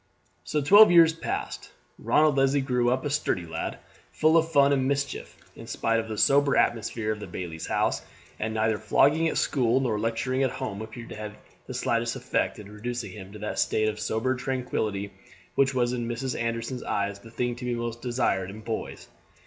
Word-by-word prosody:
So 150 - -1
twelve 205 +8 +8
years 165 -2 +7
passed. 165 - -4 0.3
Ronald 150 -2 +3
Leslie 135 +1 +3
grew 125 -2 +1
up 130 +2 0
a - - 0
sturdy 115 - 0
lad, 80 0 -4 0.3
full 155 +1 +3
of 165 0 +3
fun 140 -2 +5
and 130 -1 +1
mischief 140 0 -2 0.2
in - - -11
spite 115 0 0
of 115 - -4
the 110 - -4
sober 140 +5 +4
atmosphere 115 -1 0
of 105 - -4
the 105 - -7
bailie's 85 -3 -6
house; - - 0 0.4
and 110 +1 -2
neither 110 -1 +1
flogging 155 +4 +3
at - - -1
school 125 -3 +2
nor 115 -5 0
lecturing 115 +4 -1
at 135 - +3
home 110 -6 -5
appeared 115 +1 -8
to - - -7
have 105 -1 -7 0.3
the - - -6
slightest 115 +1 0
effect 130 -1 -1
in 105 -1 -11
reducing 115 0 -5
him 95 0 -10
to - - -8
that 105 +1 -4
state 110 0 +2
of 105 0 -5
sober 110 +4 0
tranquillity 110 -6 -2 0.4
which 135 -1 +2
was 120 -1 +1
in 120 -2 -2
Mrs. 125 +2 -3
Anderson's 115 +2 -3
eyes 100 0 -2
the 115 - -14
thing 120 +1 -2
to 125 - -6
be 120 -1 -1
most 120 0 -4
desired 120 -7 0
in 105 +3 -9
boys. 110 +1 -5
120 Hz, 195 wpm, -27 LUFS, 110-135 Hz, 0.4 s, twelve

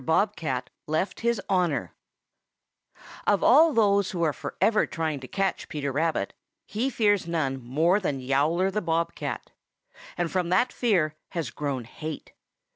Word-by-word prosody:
BOB 200 +8 +2
CAT 130 -6 -3 0.2
LEFT 160 +5 -1
HIS 235 -2 +1
HONOR 170 - 0 1.3
Of 205 - +3
all 315 +6 +7
those 200 -5 +3
who 175 -2 -2
are 155 -3 +2
forever 215 +8 +1
trying 160 -3 -2
to 130 - -9
catch 195 +9 -2
Peter 140 -2 -2
Rabbit, 160 +4 0 0.3
he 235 +6 -1
fears 205 -7 +2
none 140 -6 -1
more 160 - +2
than 145 -9 -2
Yowler 150 +8 +1
the 210 +2 -1
Bob 170 -1 0
cat. - - -5 0.7
And 175 -2 -1
from 180 -2 0
that 195 +8 +2
fear 180 -11 +2 0.2
has 165 -3 -2
grown 140 -4 -3
hate. 155 +6 -7
170 Hz, 150 wpm, -26 LUFS, 150-200 Hz, 1.3 s, all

